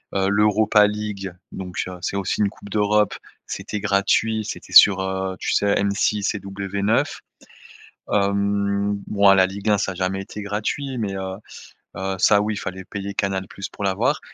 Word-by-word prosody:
heu, 95 0 +2
l'Europa 105 +1 +4
League, 105 -3 -4 0.2
donc 90 -4 -7
heu, 90 0 -7
c'est 95 - -3
aussi 100 - -2
une 100 - +3
coupe 100 - -13
d'Europe, 105 0 +2 0.3
c'était 105 - -5
gratuit. 105 +2 +1
C'était - - -7
sur, 95 -2 +8
heu, 95 0 -2
tu - - -2
sais? 100 0 +2
M6 100 +1 0
et - - -3
W9. 100 +2 -1 0.9
Hem, 100 0 +1
bon 100 -1 +4
la 95 -1 +5
Ligue 100 +3 -3
1, 105 - +4
ça 95 -1 -1
a - - -10
jamais 95 +1 -2
été 105 +1 -8
gratuit 110 +6 -3
mais 100 -4 -2
heu, 95 0 -4 0.6
heu, 95 0 -3
ça 100 +2 +5
oui 105 0 -2
fallait 95 -1 -6
payer 100 +1 -6
Canal 95 -1 -1
+ 100 - -5
pour 100 - -6
l'avoir, 95 -1 +1
100 Hz, 170 wpm, -22 LUFS, 95-105 Hz, 0.9 s, sur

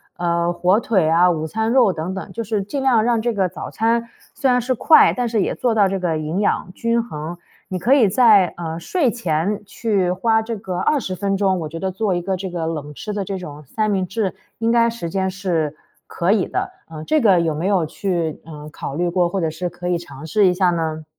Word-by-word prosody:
呃， 170 0 0
火 185 +4 +2
腿 190 -9 +1
啊、 175 +2 +5
午 160 -3 -1
餐 220 +6 -1
肉 250 -6 +5
等 170 +2 -4
等。 190 - -7
就 230 0 -5
是 210 -1 -1
尽 270 +8 -4
量 245 -5 +3
让 235 -1 +1
这 240 0 0
个 190 -3 0
早 - - -7
餐 230 +1 0 0.3
虽 275 -2 0
然 250 0 +3
是 255 +2 0
快， 310 +6 +6
但 245 -1 -1
是 225 -2 0
也 - - 0
做 240 -3 0
到 200 -3 +4
这 195 -1 -2
个 170 -3 -1
营 155 +5 -3
养 195 -2 0
均 230 +2 0
衡。 165 -4 -6 0.3
你 185 - -1
可 245 +9 +3
以 235 -8 +5
在， 210 -5 +5
呃， 165 -1 -4
睡 265 - 0
前 190 -1 -1
去 200 -2 -1
花 220 +4 +2
这 225 0 -4
个 185 -3 -4
20 190 -5 0
分 195 +1 -1
钟， 190 -2 +1
我 155 - -4
觉 165 +2 -7
得 190 +1 -2
做 195 -1 -1
一 175 - -1
个 190 +1 -1
这 190 0 -5
个 170 -2 -3
冷 150 -2 -5
吃 210 - -5
的 205 -1 -2
这 195 0 -4
种 150 -4 -9
三 215 - -1
明 190 -2 0
治， 195 0 -2 0.2
应 230 0 +1
该 235 0 +4
时 230 -7 -5
间 190 +2 -1
是 175 -6 -2 0.3
可 175 +3 0
以 205 -4 +2
的。 - - -3 0.2
呃， 155 -1 -8
这 310 - +2
个 195 -6 +5
有 165 -2 0
没 160 +5 -2
有 190 -5 +2
去， 170 -1 -3
嗯， 150 -1 -9
考 140 - -6
虑 175 +3 0
过， 175 0 +1
或 195 +2 -2
者 160 -2 -1
是 175 +3 -4
可 175 +1 -7
以 175 -1 +1
尝 145 -3 -11
试 195 +5 +3
一 180 - +3
下 180 -2 +3
呢？ 160 -2 -3
190 Hz, 260 characters per minute, -20 LUFS, 170-220 Hz, 0.3 s, 快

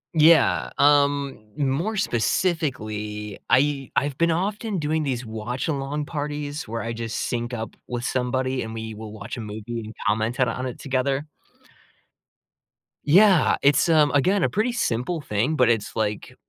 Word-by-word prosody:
Yeah, 160 -2 +5
um, 140 -2 +3 0.2
more 150 +10 0
specifically, 110 - -1
I 140 0 +2
I've 140 0 +1
been 170 0 +3
often 200 +4 -1
doing 155 0 0
these 130 -4 -2
watch-along 135 +6 -3
parties 145 -1 -4
where 115 0 -4
I 115 0 -3
just 115 -1 -4
sync 120 0 -2
up 115 -2 -5
with 120 0 -4
somebody, 130 +1 -1
and 110 0 -6
we 110 0 -5
will 110 0 -8
watch 105 +2 -7
a - - -4
movie 110 +2 -6
and 110 - -8 0.2
comment 110 +4 0
it 125 - +4
on 130 +3 -3
it 125 - -6
together. 135 +1 -1 1.8
Yeah, 190 +2 +5
it's, 140 +4 +4
um, 150 -3 +5
again, 180 +7 +2
a - - +2
pretty 220 +4 0
simple 165 - -1
thing, 125 +6 0
but 125 -3 +4
it's 110 -3 0
like, 105 -2 -2
130 Hz, 155 wpm, -24 LUFS, 115-150 Hz, 1.8 s, Yeah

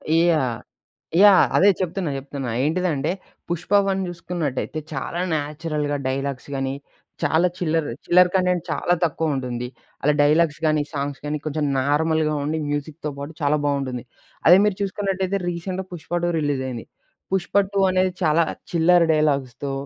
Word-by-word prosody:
Yeah! 155 -8 +2 0.6
Yeah! 200 -2 +8
అదే 200 - +6
చెప్తున్నా, 185 -2 -2
చెప్తున్నా. 135 -2 -6
ఏంటిదంటే 160 -1 0 0.4
పుష్ప 175 +2 -4 0.2
1 195 0 0
చూసుకున్నట్టయితే 165 -4 -3
చాలా 150 +5 -4 0.2
న్యాచురల్‌గా 150 -1 -2
డైలాగ్స్ 135 0 -3
గాని, 135 0 -2 0.5
చాలా 165 +3 +3
చిల్లర 165 -2 0 0.2
చిల్లర 180 +1 +6
కంటెంట్ 180 -2 +2
చాలా 175 - +1
తక్కువ 160 -1 0
ఉంటుంది. 125 -2 -3 0.4
అలా 150 - +4
డైలాగ్స్ 150 +1 +3
గాని, 155 -1 +3
సాంగ్స్ 140 -1 -3
గాని 150 +1 -1
కొంచెం 155 0 -1
నార్మల్‍గా 155 +3 +1
ఉండి, 160 +2 -1
మ్యూజిక్‌తో 145 +1 -4
పాటు 145 +3 -6
చాలా 145 +1 +2
బాగుంటుంది. 135 -4 -1 0.4
అదే 175 +3 +9
మీరు 210 -2 +1
చూసుకున్నట్టయితే 195 -1 -1
రీసెంట్‌గా 180 +2 -4
పుష్ప 170 -1 -10
2 175 - +2
రిలీజ్ 145 -3 -1
అయింది. 120 -3 -6 0.5
పుష్ప 190 -1 -1 0.2
2 200 - +1
అనేది 185 0 +2
చాలా 160 +1 +4 0.3
చిల్లర 170 +1 +4
డైలాగ్స్‌తో 140 -3 0
155 Hz, 140 wpm, -22 LUFS, 145-175 Hz, 0.6 s, అదే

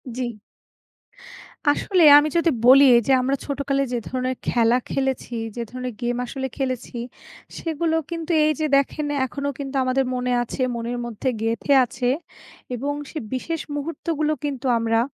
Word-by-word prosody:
জি। 240 -3 -4 1.3
আসলে 360 +3 +2
আমি 295 +1 +4
যদি 335 0 +3 0.2
বলি 270 +2 +8
এই - - +3
যে - - +3
আমরা 265 +2 +1
ছোটোকালে 275 -1 -1
যে - - +1
ধরনের 255 0 -2
খেলা 235 0 +3
খেলেছি, 265 -2 -2 0.2
যে 240 - -3
ধরনের 255 0 -5
গেম 240 0 -1
আসলে 265 +2 -4
খেলেছি, 255 -2 -3 0.6
সেগুলো 325 0 -1
কিন্তু 335 0 -4
এই 310 - +3
যে 310 - +1
দেখেন 280 +2 -1 0.2
এখনও 280 +2 -3
কিন্তু 275 0 -5
আমাদের 255 +1 +1
মনে 250 0 -1
আছে, 240 - -6
মনের 235 +1 -3
মধ্যে 240 +2 -3
গেঁথে 230 +5 +1
আছে 245 +1 -3 0.7
এবং 280 +4 -2 0.2
সে - - -7 0.2
বিশেষ 325 +5 -3
মুহূর্তগুলো 310 +1 -2
কিন্তু 275 -3 -4
আমরা 225 0 +1
265 Hz, 150 wpm, -23 LUFS, 245-290 Hz, 1.3 s, বলি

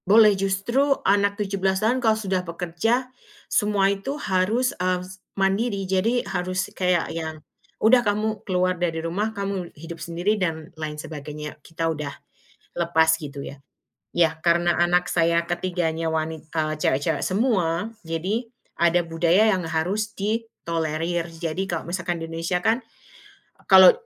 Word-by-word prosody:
Boleh 215 0 +8
,justru, 195 +9 +1
anak 200 +1 +3
17 195 -2 0
tahun 250 +3 +2
kalau 220 -2 +3
sudah 190 -4 -1
bekerja, 180 +9 -1 0.3
semua 205 -3 +2
itu 265 +9 -4
harus 215 +1 +1
mmm, 180 0 +1
s 185 0 -12 0.2
mandiri. 195 +1 +1
Jadi, 195 +6 +1
harus 185 0 -2
kayak 180 -3 +1
ya, 160 -1 -4 0.4
udah 245 +3 +5
kamu 210 -1 -1
keluar 185 -1 0
dari 165 -2 0
rumah, 200 +6 -1
kamu 200 -4 -4
hidup 165 +2 -9
sendiri, 180 +5 -1
dan 160 -3 -2
lain 155 -2 -5
sebagainya. 150 0 -7
Kita 165 +2 -4
udah 150 -2 -4 0.6
lepas 160 -1 +2
gitu, 140 -2 -7
ya. 140 - -9 0.5
Ya, 165 -2 +3
karena 170 0 +3
anak 175 +1 +3
saya 170 0 +2
ketiganya 175 -2 -1
wanit 160 0 -3
eee, 155 -1 -1
cewek-cewek 145 0 0
semua. 195 -2 0
Jadi, 190 +8 -2 0.2
ada 170 +1 +3
budaya 170 +5 +3
yang 185 - -1
harus 190 +7 0
ditolerir. 170 -6 -2
Jadi, 165 +3 -3
kalau 170 -2 -3
misalkan 175 0 -2
di 165 - -5
Indonesia 165 +2 -1
kan, 225 +7 +1 0.9
kalau 190 -2 +10
180 Hz, 140 wpm, -24 LUFS, 165-200 Hz, 0.9 s, kalau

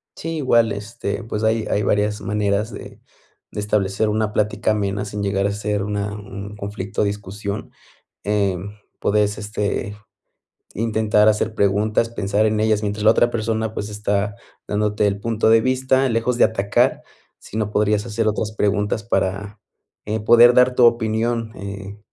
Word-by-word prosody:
Sí. 165 0 -4
Igual, 120 -5 +3
este, 105 +1 -4
pues 110 -1 -4
hay 110 0 +1
hay 105 - +1
varias 105 +1 0
maneras 105 +2 -1
de - - -10 0.5
de - - -4
establecer, 105 0 0
una 105 0 0
plática 105 +1 0
amena, 100 -1 -1
sin 105 0 -5
llegar 100 -1 0
a 100 - +1
ser 105 0 -2
una 105 0 -3
un 100 0 -8
conflicto 105 0 -4
o - - +3
discusión, 100 0 -4 0.5
em, 100 -1 -1 0.2
podés 105 0 +1
este, 105 0 -3 0.8
intentar 110 -1 +2
hacer 110 +1 0
preguntas, 105 +3 +1
pensar 105 -1 0
en 110 0 +1
ellas, 110 -1 +2
mientras 105 0 -3
la 110 - +8
otra 120 +1 +3
persona, 110 -1 -2
pues, 105 - -4
está 105 0 -1 0.3
dándote 105 0 +1
el 100 0 -1
punto 110 0 +1
de 115 0 +6
vista, 130 +1 +2
lejos 115 +1 0
de - - +5
atacar, 100 -2 +1 0.4
sino, 105 -1 -4
podrías 105 0 +1
hacer 115 -1 -1
otras 105 0 -1
preguntas, 105 +1 0
para, 100 -1 -2 0.4
eh, 110 +1 -2
poder 120 +2 +7
dar 125 0 +4
tu 125 - +4
opinión, 115 0 +1
eh, 100 +1 -8
105 Hz, 155 wpm, -21 LUFS, 100-110 Hz, 0.8 s, la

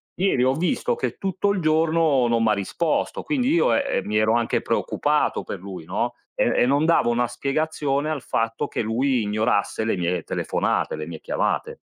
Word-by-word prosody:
ieri 180 -9 +1
ho 130 +1 +3
visto 260 - 0
che 475 - -3
tutto 195 +1 0
il 195 - -1
giorno 155 -4 +3
non 115 -1 +2
m' 110 - +3
ha 105 - +4
risposto, 125 - -1
quindi 270 -4 0
io, 345 - +3
ehm, 285 - +3 0.2
eh - - +1
mi 105 +1 0
ero 110 +1 +3
anche 120 -1 +1
preoccupato - - 0
per - - -6
lui, 95 -3 -8
no, - - -2 0.2
e - - +2
e - - +4
non 140 +4 +2
davo 165 -7 +3
una 120 0 +1
spiegazione 145 +3 -1
al 150 -4 -2
fatto 115 0 -1
che - - -3
lui 120 +3 +1
ignorasse 105 0 0
le 110 - +1
mie 90 -1 -1
le 90 -2 -2
telefonate, - - -1
le 75 - -5
mie 85 -2 -8
chiamate. - - -2
130 Hz, 200 wpm, -23 LUFS, 110-160 Hz, 0.2 s, ha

